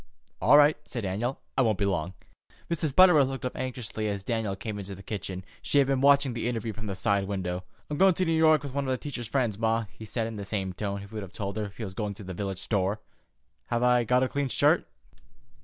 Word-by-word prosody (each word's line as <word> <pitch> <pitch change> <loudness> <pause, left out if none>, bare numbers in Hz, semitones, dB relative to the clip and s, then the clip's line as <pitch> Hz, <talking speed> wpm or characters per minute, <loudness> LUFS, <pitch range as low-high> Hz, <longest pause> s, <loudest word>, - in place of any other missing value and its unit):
"All 145 - +7
right," 150 +1 +6
said 120 - -5
Daniel. 105 +7 -2 0.2
"I 135 - +3
won't 110 -5 +2
be 100 - +1
long." 90 -1 -1 0.6
Mrs. 155 -4 -1
Butterworth 175 -7 +7
looked 135 -1 -5
up 125 - -3
anxiously 125 -4 -4
as 100 -2 -3
Dan 110 -3 -1
came 105 +1 -5
into 100 0 -6
the 95 - -12
kitchen. 95 -2 -5 0.2
She - - 0
had 140 - +6
been 135 -1 0
watching 140 -2 +5
the 115 0 -2
interview 115 -2 -2
from 110 +1 -7
the 100 - -3
side 100 +1 +1
window. 90 -2 -3 0.2
"I'm 150 - -4
goin' 190 -2 +6
to 185 - +1
New 165 - 0
York 160 -1 +4
with 140 -3 -6
one 140 -1 -1
of 130 -1 0
Teacher's 125 -6 -5
friends, 115 -4 0
ma," 115 0 +1
he 110 - -11
said, 110 +2 -2
in 110 -1 -5
the 100 - -5
same 100 -2 -3
tone 100 +1 -3
he - - -8
would 105 +1 -6
have 100 -1 -9
told 100 -3 -4
her 105 -2 -3
he 115 - -5
was 95 -3 -5
going 105 0 -3
to 105 - -10
the 95 0 -6
village 95 +1 -3
store. 100 +1 0 0.7
"Have 120 0 0
I 125 -1 +4
got 125 +3 +3
a - - +2
clean 140 0 -2
shirt?" - - +3
110 Hz, 245 wpm, -28 LUFS, 100-130 Hz, 0.7 s, All